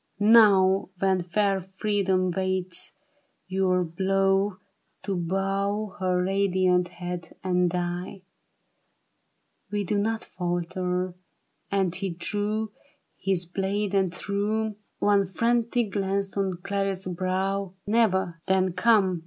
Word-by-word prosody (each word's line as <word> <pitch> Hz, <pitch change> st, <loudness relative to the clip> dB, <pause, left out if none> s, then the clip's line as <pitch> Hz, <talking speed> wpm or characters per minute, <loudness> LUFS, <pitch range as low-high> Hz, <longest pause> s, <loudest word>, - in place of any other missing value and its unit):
" -, -, -43 dB
Now 200 Hz, -4 st, +6 dB
when 190 Hz, 0 st, +2 dB
fair 195 Hz, +2 st, +1 dB
Freedom 190 Hz, -1 st, 0 dB
waits 185 Hz, -1 st, -2 dB, 0.5 s
your 185 Hz, -1 st, +2 dB
blow 195 Hz, +3 st, +1 dB, 0.5 s
To 195 Hz, 0 st, -2 dB
bow 195 Hz, +3 st, -1 dB
her 180 Hz, -1 st, +1 dB
radiant 185 Hz, -2 st, +2 dB
head 175 Hz, -1 st, -6 dB
and 180 Hz, -1 st, +2 dB
die? 180 Hz, +2 st, -3 dB, 1.5 s
We 205 Hz, -1 st, -1 dB
do 200 Hz, +2 st, 0 dB
not 220 Hz, +2 st, -1 dB
falter," 180 Hz, +1 st, -2 dB, 0.6 s
and 190 Hz, -3 st, +1 dB
he 190 Hz, +1 st, -3 dB
drew 205 Hz, +5 st, -2 dB, 0.4 s
His 185 Hz, -2 st, 0 dB
blade 195 Hz, +3 st, -2 dB
and 190 Hz, -3 st, +2 dB
threw 210 Hz, +3 st, -1 dB, 0.2 s
One 200 Hz, -1 st, +3 dB
frantic 235 Hz, +2 st, +1 dB
glance 195 Hz, 0 st, -1 dB
on 190 Hz, -3 st, -1 dB
Clarice's 195 Hz, -2 st, -2 dB
brow; 190 Hz, +1 st, -1 dB
" -, -, -46 dB
Never! 190 Hz, -6 st, +1 dB
Then 190 Hz, -1 st, +2 dB
come." 195 Hz, -5 st, +3 dB
190 Hz, 110 wpm, -26 LUFS, 180-200 Hz, 1.5 s, Now